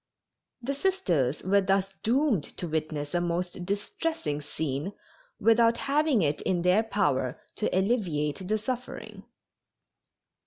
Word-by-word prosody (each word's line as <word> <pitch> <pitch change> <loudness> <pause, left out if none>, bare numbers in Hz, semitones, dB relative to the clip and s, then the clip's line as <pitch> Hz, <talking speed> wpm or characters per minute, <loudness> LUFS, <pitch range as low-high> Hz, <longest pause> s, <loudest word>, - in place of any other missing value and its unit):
The 275 +4 -1
Sisters 180 - +1
were 200 +2 +4
thus 195 0 +1
doomed 245 - +2
to 175 - -3
witness 155 -2 -2
a 175 - +2
most 175 +1 -2
distressing 200 - -2
scene 150 +4 -3 0.5
without 230 +1 +5
having 280 - +2
it 145 -1 0
in 175 -2 0
their 180 +4 +5
power 145 - 0 0.2
to 215 - 0
alleviate 185 - 0
the 215 +2 +2
suffering. 250 +3 -5
190 Hz, 120 wpm, -28 LUFS, 155-230 Hz, 0.5 s, without